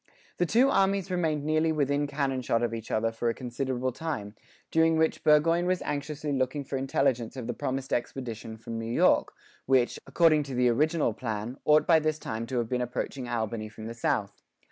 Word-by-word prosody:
The 175 - +1
two 255 +7 +4
armies 195 -1 +2
remained 160 -5 0
nearly 155 +1 +2
within 145 -1 +1
cannon 140 -2 -1
shot 115 -1 0
of 115 -1 -1
each 115 -1 -6
other 115 +1 +1
for 115 +1 -1
a 115 - -2
considerable 130 0 -2
time, 125 -8 -5 0.4
during 160 0 +3
which 160 0 +1
Burgoyne 165 +3 +4
was 185 0 0
anxiously 150 0 -3
looking 130 +2 -1
for 135 - -5
intelligence 135 -3 0
of 125 - -5
the 120 - -3
promised 135 0 -3
expedition 115 -3 -4
from 115 0 -6
New 115 0 -4
York, - - +3 0.4
which, 130 -2 +2
according 160 -3 +4
to 140 -3 -6
the 125 0 +3
original 150 +1 +2
plan, 110 +2 -4
ought 150 0 +5
by 165 -2 +5
this 155 0 0
time 115 -5 -5
to 130 - -3
have 120 -1 0
been 125 +1 -1
approaching 125 +1 -4
Albany 110 -2 -2
from 110 0 -10
the 115 - -5
south. 105 -3 -2
130 Hz, 195 wpm, -28 LUFS, 115-155 Hz, 0.4 s, ought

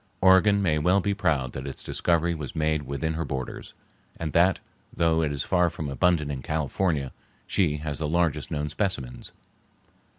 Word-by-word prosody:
Oregon 100 +2 +5
may 80 -4 +2
well 90 +6 +3
be 100 +1 0
proud 75 -10 0
that 65 +2 -6
its 70 - -6
discovery 85 0 +1
was 75 -5 -6
made 75 -2 0
within 70 +4 -2
her 80 +1 -2
borders, 65 -5 -6 0.4
and 80 -4 -3
that, 90 +3 +4 0.3
though 80 -1 +2
it 75 -2 0
is 70 -2 -2
far 90 -2 +2
more 75 -3 -3
abundant 75 0 +2
in 65 -2 -4
California, 75 0 -1 0.3
she 80 -6 +1
has 75 -1 -5
the 80 - -1
largest 85 -2 0
known 75 -1 -2
specimens. 75 - -3
80 Hz, 170 wpm, -26 LUFS, 70-90 Hz, 0.4 s, Oregon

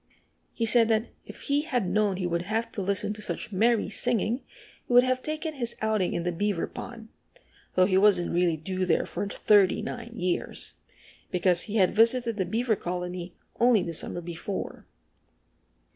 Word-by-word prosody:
He 230 - -2
said 230 0 +5
that 225 +1 +1 0.2
if - - -11
he 285 0 +1
had 250 - -1
known 200 0 +1
he 185 - -2
would 170 -1 0
have 225 +5 -2
to 205 - -4
listen 200 +2 0
to 210 - -8
such 210 - -4
merry 220 +3 +2
singing 235 +2 0 0.5
he - - -2
would 245 0 +8
have 255 0 0
taken 310 +2 -4
his 240 -5 -4
outing 215 -4 0
in 170 - -1
the 175 - 0
Beaver 200 +1 -1
Pond, 225 -2 -9 0.7
though 185 - +5
he 190 0 +3
wasn't 195 -4 +3
really 170 -2 +2
due 185 +4 -3
there 165 - +2
for 205 - -4
thirty 205 -1 +3
nine 235 +1 -6
years, 180 -4 -2 0.6
because 180 -1 +2
he 210 - -3
had 190 -4 +3
visited 230 +1 +3
the 190 - 0
Beaver 225 +2 0
colony 180 0 -5 0.2
only 235 -4 +4
the 170 - -4
summer 175 +2 -3
before. 175 +3 -6
210 Hz, 175 wpm, -27 LUFS, 180-235 Hz, 0.7 s, would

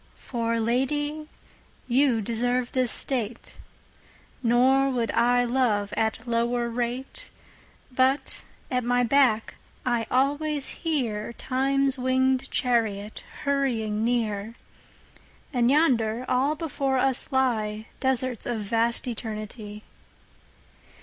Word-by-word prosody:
For 230 -2 -2
Lady 290 +6 -1 0.6
you 255 -2 +3
deserve 245 +3 -1
this 255 -3 +1
State; 240 -4 -2 0.9
Nor 260 +3 +4
would 235 -4 -1
I 245 +1 +3
love 235 -5 +1
at 225 +1 -1
lower 235 +1 0
rate. 245 - -4 0.6
But 260 +2 +1 0.3
at 250 -1 +1
my 245 +1 +2
back 245 -3 +2 0.3
I 240 -3 0
alwaies 285 +2 0
hearTimes 270 0 0
winged 260 +1 +1
Charriot 220 -5 0 0.2
hurrying 235 -7 0
near:And 235 +2 -4
yonder 250 -6 +2
all 265 +4 +2
before 275 -4 -1
us 260 0 +1
lyeDesarts 250 0 -1
of 235 -3 -2
vast 230 +4 0
Eternity. 215 -2 -6
245 Hz, 90 wpm, -26 LUFS, 230-265 Hz, 0.9 s, Nor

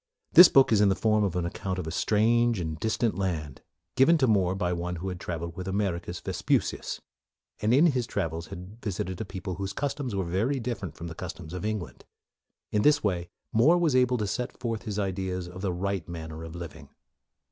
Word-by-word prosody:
This 175 -1 +11
book 135 -3 +5
is 105 -2 +5
in 105 - +5
the 95 - +2
form 110 0 +2
of 95 -4 0
an 90 -1 0
account 95 +2 -3
of 90 - -3
a 80 - -4
strange 115 +4 +2
and 80 -2 -4
distant 110 0 0
land, 80 -8 -3 0.3
given 150 +6 +5
to 135 - +3
More 95 -6 +2
by 90 -2 0
one 90 +1 -3
who 90 +3 -4
had 90 -1 -5
traveled 85 -1 -5
with 90 0 -6
Americus 95 -3 -2
Vespucius, - - -1 0.6
and 105 +2 +2
in 140 +7 +6
his 130 -8 +2
travels 80 +1 -3
had 95 +4 -10
visited 95 -3 -3
a - - -3
people 95 -1 -6
whose 100 0 -3
cus 145 +5 -1
toms 130 -7 -4
were 95 -2 -1
very 110 +11 0
different 115 - -4
from 85 - -8
the 85 - -6
customs 80 0 -7
of 90 - -5
England. 105 -4 -4 0.7
In 105 - +2
this 145 +5 +4
way, 90 -4 -1 0.2
More 140 +11 +5
was 165 -6 +2
able 125 -1 +3
to 105 - -1
set 120 +5 -3
forth 115 -2 -3
his 105 -2 -3
ideas 95 -2 -2
of 90 +1 -9
the 95 -2 0
right 95 -1 -3
manner 80 -1 -7
of 80 0 -8
living. 80 -4 -8
95 Hz, 210 wpm, -28 LUFS, 85-115 Hz, 0.7 s, This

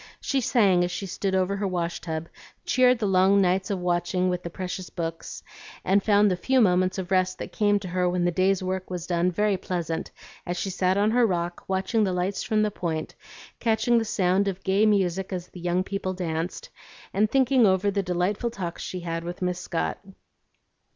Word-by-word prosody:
She 275 -2 0
sang 200 -8 +3
as 175 - 0
she 195 - -4
stood 190 +1 -2
over 190 +1 +1
her 200 0 -1
wash 175 -2 -2
tub, 160 -1 -4 0.4
cheered 255 -1 +4
the 225 - -2
long 190 +1 +4
nights 190 0 +1
of 200 - -1
watching 180 +1 0
with 180 0 -2
the 170 - -6
precious 185 +1 -5
books, 165 -1 -5 0.4
and 200 +1 +3
found 205 0 +4
the - - +1
few 260 +9 +1
moments 185 -3 +3
of 185 -1 -5
rest 185 0 +2
that - - -7
came 205 -1 +2
to 190 - -6
her 180 0 +1
when 175 0 0
the 175 - +2
day's 185 +2 +1
work 185 0 -3
was 180 -2 -4
done 175 0 +1
very 205 +2 +1
pleasant, 170 -3 -3 0.3
as 175 0 -4
she 195 - -2
sat 185 +1 +1
on 210 +2 +3
her 240 0 +4
rock, 175 -2 -2
watching 195 +4 +1
the 190 -3 0
lights 180 +2 -1
from 215 -2 +1
the 210 - 0
Point, 160 -4 -3 0.5
catching 230 +1 +2
the - - -1
sound 190 -1 +1
of 190 -1 -3
gay 200 +3 +3
music 190 -2 +1
as 180 -1 -5
the 180 - -11
young 175 +1 0
people 195 -1 -3
danced, 175 - -4 0.4
and 210 +2 +2
thinking 260 -2 +4
over 190 +1 +2
the 200 0 0
delightful 185 +5 -1
talks 185 -7 -5
she 185 - -5
had 165 -1 -4
with 175 +2 -5
Miss 180 0 -1
Scott. 170 -2 -3
185 Hz, 205 wpm, -25 LUFS, 180-205 Hz, 0.5 s, cheered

